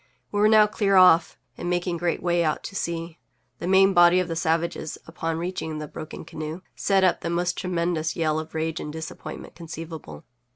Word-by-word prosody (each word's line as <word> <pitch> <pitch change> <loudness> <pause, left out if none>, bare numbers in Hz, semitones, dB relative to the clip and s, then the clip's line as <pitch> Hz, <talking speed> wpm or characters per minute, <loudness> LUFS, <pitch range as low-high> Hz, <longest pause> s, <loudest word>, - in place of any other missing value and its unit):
We 205 - -1
were 210 +1 +5
now 215 -1 +7
clear 205 -2 +1
off, 180 -3 +6 0.2
and 175 - -3
making 175 0 -1
great 170 -1 -1
way 175 -1 +2
out 155 -2 -1
to 195 - -7
sea. 170 -2 -4 0.4
The 170 - -4
main 195 +1 +5
body 175 0 +6
of 180 - 0
the 165 - -3
savages, 160 0 -1
upon 165 0 -3
reaching 165 -2 -4
the 150 0 -5
broken 155 +1 -8
canoe, 155 +3 -6
set 195 -1 +2
up 185 - +3
the 170 - -3
most 175 +1 0
tremendous 170 -3 -1
yell 155 -2 +1
of 160 0 -8
rage 160 +1 -2
and 150 - -5
disappointment 160 +1 -8
conceivable. 160 - -8
170 Hz, 195 wpm, -25 LUFS, 160-180 Hz, 0.4 s, now